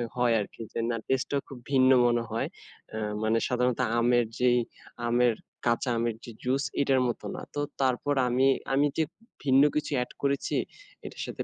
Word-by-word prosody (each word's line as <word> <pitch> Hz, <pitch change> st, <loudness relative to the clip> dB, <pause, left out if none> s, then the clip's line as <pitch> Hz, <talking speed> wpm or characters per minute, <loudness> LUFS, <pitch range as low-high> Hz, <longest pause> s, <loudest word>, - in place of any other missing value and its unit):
হয় 120 Hz, -1 st, +3 dB
আরকি 105 Hz, -, -6 dB
যে -, -, -2 dB
না 115 Hz, -, 0 dB
টেস্টটা 135 Hz, +2 st, 0 dB
খুব 135 Hz, -, -9 dB
ভিন্ন 130 Hz, -1 st, +5 dB, 0.2 s
মনে 120 Hz, -1 st, +1 dB
হয়। 115 Hz, +1 st, -1 dB, 0.5 s
আ -, -, -3 dB, 0.3 s
মানে 110 Hz, +1 st, +2 dB
সাধারণত 125 Hz, -1 st, 0 dB, 0.2 s
আমের 120 Hz, 0 st, +3 dB
যেই 125 Hz, -1 st, +4 dB, 0.5 s
আমের, 120 Hz, 0 st, +3 dB, 0.3 s
কাঁচা 120 Hz, +2 st, +1 dB
আমের 115 Hz, -1 st, 0 dB
যে 120 Hz, -, -8 dB
জুস 135 Hz, +2 st, +1 dB, 0.2 s
এটার 135 Hz, -2 st, +3 dB
মতো 120 Hz, -, -4 dB
না। -, -, -6 dB
তো 145 Hz, -, 0 dB, 0.2 s
তারপর 130 Hz, +2 st, +1 dB
আমি 125 Hz, +2 st, +3 dB, 0.3 s
আমি 140 Hz, +2 st, +4 dB
যে 160 Hz, -, +3 dB, 0.4 s
ভিন্ন 135 Hz, 0 st, +5 dB
কিছু 150 Hz, 0 st, -1 dB
অ্যাড 125 Hz, 0 st, -2 dB
করেছি, 140 Hz, 0 st, 0 dB, 0.5 s
এটার -, -, -7 dB
সাথে -, -, -5 dB
125 Hz, 175 wpm, -28 LUFS, 120-135 Hz, 0.5 s, ভিন্ন